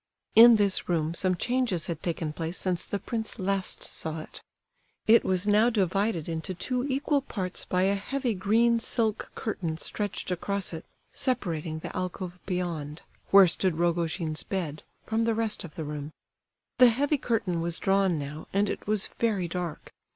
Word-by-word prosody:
In 235 +1 +10
this 200 -4 +1
room 165 -2 +1
some 185 +1 +1
changes 240 -4 0
had 165 -2 -4
taken 165 -3 -2
place 165 +2 -4
since 180 -3 -1
the 205 - -3
prince 220 +1 -4
last 195 0 -1
saw 160 0 -4
it. - - -10 0.6
It 230 +2 +6
was 185 0 +1
now 210 +3 +5
divided 195 -4 0
into 165 +3 -3
two 250 +7 -1
equal 280 +1 +1
parts 190 -8 -4
by 180 0 +1
a 195 +1 +3
heavy 245 +5 -1
green 225 +5 +3
silk 225 -2 -1
curtain 170 -7 -3
stretched 205 +1 -3
across 195 +1 -2
it, 160 - -7 0.3
separating 165 -11 -1
the - - -7
alcove 180 0 -4
beyond, 165 -5 -3 0.3
where 195 -1 +9
stood 180 -1 +1
Rogojin's 170 -2 0
bed, 165 -6 -4 0.2
from 225 +1 0
the 230 -1 +1
rest 225 -1 -1
of 165 -4 -10
the 160 - -4
room. 150 0 -6 0.7
The 250 -1 +9
heavy 280 +5 +1
curtain 205 -9 0
was 170 0 +1
drawn 195 -3 +2
now, 150 +2 -6
and 200 +1 +1
it - - -7
was 210 -2 +1
very 205 -6 -1
dark. 175 -2 -5
185 Hz, 165 wpm, -28 LUFS, 170-220 Hz, 0.7 s, In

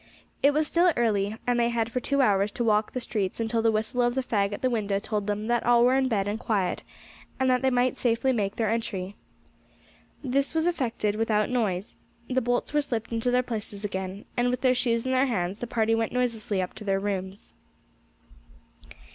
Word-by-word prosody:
It 285 - +5
was 300 +1 +1
still 345 +2 +4
early, 215 -2 +1
and 245 -1 +1
they 235 0 +3
had 230 -1 -1
for 250 - -1
two 280 +2 +1
hours 200 -2 +2
to 240 - -2
walk 215 -1 +2
the 255 - -3
streets 210 -5 -3
until 225 0 0
the 225 0 +3
whistle 220 +3 -1
of 240 0 +1
the 265 - 0
fag 200 -5 0
at 205 - -6
the 255 - +3
window 205 -4 0
told 205 0 -3
them 210 +1 -2
that 240 0 +1
all 240 0 +5
were 250 - +4
in 265 0 +2
bed 205 -5 0
and 210 +2 -2
quiet, 200 -7 -1 0.6
and 260 -1 +3
they 265 - +4
might 250 0 +1
safely 240 +2 +1
make 205 -4 -1
their 225 - 0
entry. 205 -4 -3 1.1
This 275 +3 0
was 320 0 +2
effected 240 -11 0
without 215 0 +1
noise; 210 -6 -1 0.3
the 260 0 +1
bolts 245 +4 -1
were 295 - +3
slipped 235 -6 -3
into 230 +2 0
their 250 +1 +2
places 215 -4 -5
again, 190 0 -5
and 245 0 +2
with 250 0 -2
their 255 -1 +4
shoes 235 -2 0
in 260 - -1
their 260 +1 +3
hands, 190 -3 -2
the 240 - -4
party 225 -1 +1
went 225 -1 0
noiselessly 225 -6 0
up 180 - -6
to - - -10
their 195 -1 +1
rooms. 195 0 -4
230 Hz, 210 wpm, -26 LUFS, 205-250 Hz, 1.1 s, It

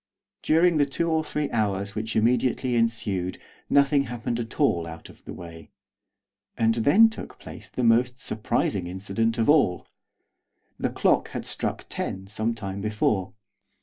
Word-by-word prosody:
During 165 +1 +3
the 145 - +3
two 165 +4 -1
or 160 0 +2
three 150 -1 -3
hours 100 -3 -1
which 110 +1 -4
immediately 125 +2 +2
ensued 110 -6 0 0.3
nothing 140 0 +4
happened 120 -1 -3
at 115 +3 -6
all 85 - +2
out 80 0 -10
of - - -17
the - - -7
way, 85 -2 -10 0.9
and 115 0 +3
then 145 - +6
took 225 - -8
place - - -11
the 125 - -3
most 125 +2 +3
surprising 100 -3 -1
incident 100 +5 -1
of 115 - +1
all. 145 - +3 0.9
The - - 0
clock - - +1
had - - -4
struck - - -3
ten 95 0 -4
some 110 +3 -2
time 100 -3 -5
before. 105 -3 0
115 Hz, 150 wpm, -25 LUFS, 100-130 Hz, 0.9 s, then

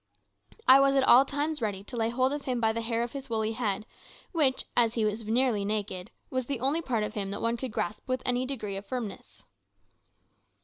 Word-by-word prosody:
I 265 +1 +9
was 275 0 +4
at 270 - +4
all 260 +1 +7
times 295 +1 -2
ready 200 -3 -2
to 245 - -9
lay 225 -1 +1
hold 260 +3 +1
of 290 -1 -5
him 250 -2 -1
by 220 -1 +2
the 230 - -2
hair 230 0 -1
of 240 - -4
his 275 -2 -7
woolly 220 -1 0
head, 220 -3 -2 0.5
which, 285 -7 +2
as 230 -2 +3
he 225 -2 +1
was 215 +2 -1
nearly 230 -2 +2
naked, 200 -2 -3 0.2
was 255 -2 -2
the 275 -4 -2
only 275 +7 +1
part 235 -8 -1
of 210 - -4
him 200 -3 -3
that 200 - -4
one 230 +1 0
could 250 0 -5
grasp 210 +3 -3
with 255 0 -1
any 250 +1 +1
degree 215 -7 -4
of 200 0 -8
firmness. 245 -5 -6
235 Hz, 220 wpm, -28 LUFS, 215-260 Hz, 0.5 s, I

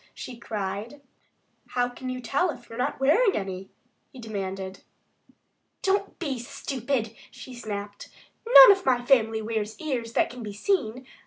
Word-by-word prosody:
she 250 - -8
cried. 215 +3 -5 0.8
"How 245 0 +3
can 250 +1 -7
you 255 0 -4
tell 280 +9 +1
if 240 -6 -7
you've 230 - -7
never 250 - +2
tried - - -20
wearing 385 - +4
any?" 190 -1 -5 0.4
he - - -14
demanded. 195 -4 -5 1.0
"Don't 395 +1 0
be 280 -7 -3
stupid!" 250 -2 -3
she 260 - -11
snapped. 205 -3 -6 0.4
"None - - +11
of 380 - -11
my 245 -2 +1
family 225 -4 +3
wears 220 -1 -3
ears 245 -7 -3
that - - +2
can 250 0 -9
be 210 -2 -6
seen. 255 - -1
240 Hz, 155 wpm, -26 LUFS, 215-270 Hz, 1.0 s, None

